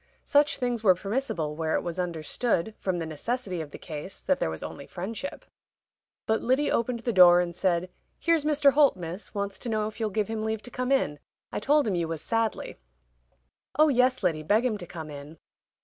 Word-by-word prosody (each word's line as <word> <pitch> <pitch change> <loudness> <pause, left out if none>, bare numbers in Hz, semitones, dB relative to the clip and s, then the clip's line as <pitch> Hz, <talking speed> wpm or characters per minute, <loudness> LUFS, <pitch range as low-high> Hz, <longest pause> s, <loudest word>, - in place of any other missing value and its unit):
Such 290 +1 +3
things 245 -3 -1
were 185 -4 +6
permissible 195 - -2
where 160 0 -1
it - - 0
was 175 +1 -4
understood, 180 +4 -1
from 185 -2 -1
the 165 - -3
necessity 185 - -3
of 155 - -7
the - - -9
case, 145 - -8
that - - +1
there - - 0
was 80 - -6
only 140 - -7
friendship. 220 +9 -6 0.8
But 220 0 +1
Lyddy 260 +4 +2
opened 235 0 0
the 235 0 -1
door 175 -2 +8
and 175 -1 -1
said, 180 -1 0 0.3
"Here's 335 -3 +2
Mr. 295 -2 +4
Holt, 285 -5 +5
Miss, 175 +4 -7
wants 200 -1 -3
to 240 - -4
know 215 -1 0
if 215 +2 -6
you'll 220 -1 0
give 210 0 -1
him 220 -1 -3
leave 220 -1 -2
to 245 - -8
come 255 +2 -2
in. 150 - +1 0.3
I - - -2
told 290 +4 +3
him 205 - +1
you 170 -2 0
was 160 -2 -4
sadly." 225 -1 -1 1.0
"Oh, 310 +1 +6
yes, 255 -3 +3
Lyddy, 165 -4 +1
beg 210 +10 +2
him 220 -4 0
to 175 - -8
come 160 -3 -7
in." 145 +2 -10
205 Hz, 210 wpm, -27 LUFS, 170-245 Hz, 1.0 s, door